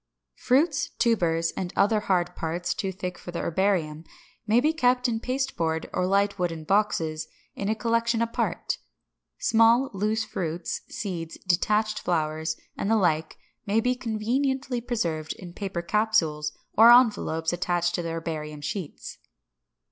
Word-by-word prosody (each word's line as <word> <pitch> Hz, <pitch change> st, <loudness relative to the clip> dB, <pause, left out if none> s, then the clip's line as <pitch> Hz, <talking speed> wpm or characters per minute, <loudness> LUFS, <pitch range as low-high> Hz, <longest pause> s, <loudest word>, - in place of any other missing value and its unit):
569. 260 Hz, +4 st, +4 dB
Fruits, 300 Hz, -4 st, -3 dB
tubers, 170 Hz, -8 st, +2 dB
and 180 Hz, -2 st, -3 dB
other 215 Hz, +2 st, +3 dB
hard 180 Hz, -4 st, 0 dB
parts, 170 Hz, +2 st, -2 dB
too 195 Hz, -, -3 dB
thick 180 Hz, -1 st, -6 dB
for -, -, -10 dB
the 170 Hz, -, -4 dB
herbarium, 170 Hz, -4 st, 0 dB, 0.4 s
may 220 Hz, +3 st, +5 dB
be 305 Hz, +5 st, +2 dB
kept 250 Hz, -4 st, +2 dB
in 225 Hz, -2 st, -1 dB
pasteboard 230 Hz, -12 st, -2 dB
or 180 Hz, 0 st, 0 dB
light 200 Hz, +1 st, +1 dB
wooden 165 Hz, -3 st, -2 dB
boxes, 160 Hz, -5 st, 0 dB, 0.3 s
in 200 Hz, -, -3 dB
a 220 Hz, -, +1 dB
collection 230 Hz, 0 st, +1 dB
apart. 230 Hz, -3 st, -1 dB, 0.6 s
Small 230 Hz, +4 st, +4 dB
loose 215 Hz, +3 st, 0 dB
fruits, 170 Hz, -5 st, -3 dB
seeds, 180 Hz, -8 st, -5 dB
detached 210 Hz, +4 st, +2 dB
flowers, 160 Hz, -1 st, -1 dB, 0.2 s
and 200 Hz, -, -2 dB
the 225 Hz, -, +4 dB
like 160 Hz, -5 st, +1 dB, 0.3 s
may 210 Hz, +3 st, +3 dB
be 250 Hz, +2 st, +2 dB
conveniently 250 Hz, +2 st, -1 dB
preserved 170 Hz, -10 st, -2 dB
in 175 Hz, -2 st, -11 dB
paper 190 Hz, -3 st, -4 dB
capsules 170 Hz, -7 st, +1 dB, 0.2 s
or 230 Hz, +2 st, +9 dB
envelopes, 205 Hz, -9 st, +4 dB
attached 175 Hz, 0 st, 0 dB
to 175 Hz, -, -1 dB
the 170 Hz, -, -4 dB
herbarium 155 Hz, -2 st, -4 dB
sheets. 165 Hz, +1 st, -6 dB
195 Hz, 145 wpm, -26 LUFS, 165-230 Hz, 0.6 s, or